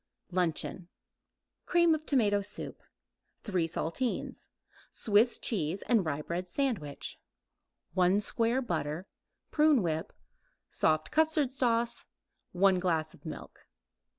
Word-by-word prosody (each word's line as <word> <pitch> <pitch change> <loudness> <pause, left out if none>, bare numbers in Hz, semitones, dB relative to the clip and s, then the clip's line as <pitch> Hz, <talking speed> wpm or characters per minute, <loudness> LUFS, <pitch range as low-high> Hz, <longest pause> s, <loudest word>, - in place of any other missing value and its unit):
LUNCHEON 175 0 -1 0.8
Cream 340 -2 +4
of 310 0 -3
tomato 210 -7 +3
soup; 205 +1 -6 0.6
3 185 -6 0
saltines; 180 +9 -3 0.4
Swiss 220 +2 +3
cheese 185 -4 -1
and 230 -5 +3
rye 150 -2 -2
bread 175 +3 -3
sandwich; 180 - -3 0.7
1 185 +1 +4
square 235 +4 0
butter; 165 -4 -2 0.5
prune 300 -7 +4
whip, 160 -2 -2 0.6
soft 155 0 +1
custard 310 -4 +2
sauce; 235 -2 0 0.4
1 190 0 +4
glass 165 -4 0
milk. - - -9
200 Hz, 100 wpm, -31 LUFS, 170-245 Hz, 0.8 s, Cream